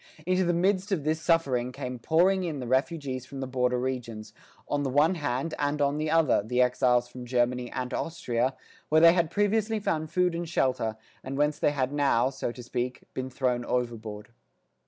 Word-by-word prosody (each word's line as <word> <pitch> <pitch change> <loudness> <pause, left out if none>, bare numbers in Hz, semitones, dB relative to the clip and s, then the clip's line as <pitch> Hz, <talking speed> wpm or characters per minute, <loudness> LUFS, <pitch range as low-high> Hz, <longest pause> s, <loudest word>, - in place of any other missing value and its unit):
Into 185 +1 +2
the 175 - +2
midst 190 +3 +1
of 175 -7 0
this 155 +1 0
suffering 140 -7 +1
came 125 0 -6
pouring 180 +8 +3
in 160 -5 -3
the 125 - -5
refugees 130 0 -1
from 135 - -8
the 135 - -2
border 125 -1 0
regions, 120 -4 -4 0.3
on 145 0 0
the 140 - -1
one 145 +6 +3
hand, 145 -1 -2
and 145 +1 0
on 145 +1 +1
the 155 0 -1
other, 165 -7 +3
the 125 +4 -2
exiles 125 -1 +3
from 125 +1 -9
Germany 125 0 0
and 125 -1 -4
Austria, 130 -5 -1 0.3
where 155 - +5
they 165 0 +8
had 170 -3 +1
previously 210 +3 +1
found 160 -6 -1
food 180 0 +1
and 170 0 -4
shelter, 125 -8 0 0.3
and 135 +1 -5
whence 150 +1 +1
they - - +3
had 135 -2 -1
now, 135 -3 +2
so 130 -2 -3
to 120 +1 -10
speak, 125 +1 -3
been 130 0 -4
thrown 125 -1 -1
overboard. 115 -4 -3
135 Hz, 195 wpm, -28 LUFS, 125-165 Hz, 0.3 s, they